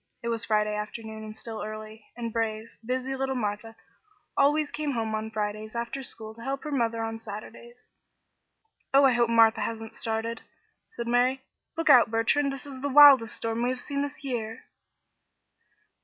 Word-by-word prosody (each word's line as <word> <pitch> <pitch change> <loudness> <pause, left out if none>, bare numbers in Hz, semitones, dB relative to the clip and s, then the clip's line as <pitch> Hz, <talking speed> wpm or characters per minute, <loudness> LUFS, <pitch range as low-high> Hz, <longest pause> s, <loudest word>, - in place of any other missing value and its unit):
It 235 - -2
was 230 -1 0
Friday 210 -1 +1
afternoon 220 +1 -6
and 215 0 -9
still 225 -1 -7
early, 215 0 -8
and 230 -2 -4
brave, 225 0 -2
busy 255 +3 -2
little 265 0 -2
Martha 220 -1 -3 0.6
always 295 +1 +3
came 300 -2 -2
home 225 -2 -2
on 220 0 -2
Fridays 215 0 -4
after 235 +3 -3
school 220 -4 -7
to 230 - -14
help 270 +3 -3
her 300 - -5
mother 230 -4 0
on 225 0 -4
Saturdays. 225 +3 -10 1.1
"Oh, 275 - +7
I 270 - +6
hope 240 -1 +2
Martha 225 -1 +5
hasn't 225 -1 -4
started," 225 +1 -3 0.5
said 235 - -6
Mary. 250 +2 +2 0.3
"Look 330 - +4
out, 240 -2 +7
Bertrand. 230 +6 +1
This 275 0 -5
is 270 -2 -8
the 285 - -1
wildest 275 -5 +8
storm 230 0 -2
we 245 - +1
have 255 -1 -3
had 280 -1 -1
this 285 +1 -6
year." 230 -4 -4
230 Hz, 170 wpm, -27 LUFS, 220-260 Hz, 1.1 s, wildest